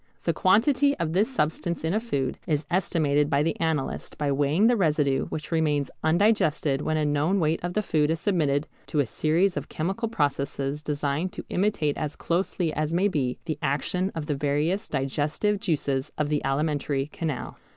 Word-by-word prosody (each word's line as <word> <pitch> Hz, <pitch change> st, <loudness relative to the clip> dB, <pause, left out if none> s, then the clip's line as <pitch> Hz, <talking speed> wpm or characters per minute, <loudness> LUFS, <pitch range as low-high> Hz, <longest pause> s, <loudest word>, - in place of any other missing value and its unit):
The 170 Hz, -, +1 dB
quantity 260 Hz, -, +3 dB
of 165 Hz, -1 st, -2 dB
this 210 Hz, +8 st, +2 dB
substance 170 Hz, -5 st, -1 dB
in 160 Hz, +2 st, 0 dB
a 215 Hz, -, +2 dB
food 140 Hz, -, -2 dB
is 150 Hz, -3 st, 0 dB
estimated 150 Hz, -5 st, +2 dB
by 140 Hz, -1 st, +2 dB
the 165 Hz, -, 0 dB
analyst 160 Hz, -4 st, -2 dB
by 145 Hz, -1 st, 0 dB
weighing 145 Hz, +8 st, +2 dB
the 240 Hz, +1 st, +5 dB
residue 150 Hz, -8 st, +1 dB
which 155 Hz, +2 st, -6 dB
remains 150 Hz, -4 st, +1 dB
undigested 160 Hz, -5 st, +2 dB
when 155 Hz, 0 st, 0 dB
a 155 Hz, -, +1 dB
known 150 Hz, +7 st, +1 dB
weight 160 Hz, 0 st, 0 dB
of 175 Hz, 0 st, -3 dB
the 215 Hz, -, +1 dB
food 150 Hz, -5 st, +1 dB
is 160 Hz, 0 st, 0 dB
submitted 155 Hz, -6 st, +1 dB, 0.2 s
to -, -, -3 dB
a 140 Hz, -, +3 dB
series 165 Hz, -, +1 dB
of 145 Hz, -, -4 dB
chemical 195 Hz, +8 st, -2 dB
processes 140 Hz, -5 st, -1 dB
designed 150 Hz, +4 st, -2 dB
to -, -, -7 dB
imitate 180 Hz, -7 st, 0 dB
as 150 Hz, -1 st, -3 dB
closely 175 Hz, -1 st, -1 dB
as 155 Hz, +2 st, -1 dB
may 195 Hz, +4 st, +3 dB
be 130 Hz, -8 st, -1 dB
the 160 Hz, -3 st, -3 dB
action 180 Hz, +7 st, 0 dB
of 160 Hz, -2 st, -3 dB
the 150 Hz, -, -1 dB
various 150 Hz, +8 st, 0 dB
digestive 150 Hz, +9 st, -1 dB
juices 140 Hz, -7 st, -1 dB
of 150 Hz, -1 st, 0 dB
the 150 Hz, -1 st, 0 dB
alimentary 140 Hz, 0 st, 0 dB
canal. 155 Hz, -, -4 dB
155 Hz, 180 wpm, -26 LUFS, 145-180 Hz, 0.2 s, the